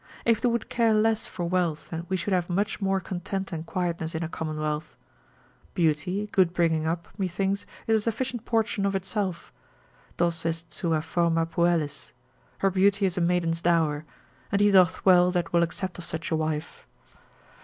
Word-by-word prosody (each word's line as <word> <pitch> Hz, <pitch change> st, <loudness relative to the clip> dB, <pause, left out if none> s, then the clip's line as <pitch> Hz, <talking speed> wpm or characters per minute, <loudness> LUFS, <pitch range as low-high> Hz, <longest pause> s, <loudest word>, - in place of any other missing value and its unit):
If 230 Hz, -2 st, +3 dB
they 245 Hz, -, +3 dB
would 235 Hz, -2 st, -1 dB
care 230 Hz, -2 st, +2 dB
less 220 Hz, 0 st, +2 dB
for 175 Hz, -2 st, -4 dB
wealth, 170 Hz, -3 st, -1 dB, 0.2 s
we 190 Hz, -, +1 dB
should 185 Hz, +3 st, -2 dB
have 180 Hz, -1 st, 0 dB
much 205 Hz, +4 st, -1 dB
more 195 Hz, 0 st, +1 dB
content 190 Hz, +1 st, -4 dB
and 165 Hz, -1 st, -5 dB
quietness 170 Hz, -3 st, -2 dB
in 160 Hz, -, -2 dB
a -, -, -2 dB
commonwealth. 155 Hz, -1 st, -4 dB, 0.8 s
Beauty, 175 Hz, +5 st, +1 dB
good 180 Hz, -3 st, +3 dB
bringing 165 Hz, -3 st, +1 dB
up, 170 Hz, +1 st, -2 dB
methinks, 195 Hz, +1 st, -1 dB, 0.2 s
is 220 Hz, -1 st, +3 dB
a -, -, -5 dB
sufficient 235 Hz, +2 st, -2 dB
portion 225 Hz, -3 st, 0 dB
of 195 Hz, -, -1 dB
itself, 190 Hz, -2 st, -3 dB, 0.6 s
Dos 170 Hz, -1 st, 0 dB
est 165 Hz, 0 st, -3 dB
sua 160 Hz, -1 st, 0 dB
forma 165 Hz, 0 st, +1 dB
puellis, 165 Hz, -4 st, 0 dB, 0.4 s
her 195 Hz, -, +2 dB
beauty 200 Hz, +2 st, +3 dB
is 185 Hz, -2 st, 0 dB
a 180 Hz, -, 0 dB
maiden's 170 Hz, -1 st, +1 dB
dower, 160 Hz, -3 st, +2 dB, 0.5 s
and 200 Hz, -, +2 dB
he 205 Hz, 0 st, +5 dB
doth 185 Hz, -2 st, +4 dB
well 180 Hz, -1 st, +6 dB
that 175 Hz, -2 st, -1 dB
will 170 Hz, -, +5 dB
accept 180 Hz, +2 st, -2 dB
of -, -, -7 dB
such 165 Hz, 0 st, -4 dB
a -, -, +3 dB
wife. 155 Hz, -1 st, -3 dB
175 Hz, 175 wpm, -26 LUFS, 165-195 Hz, 0.8 s, well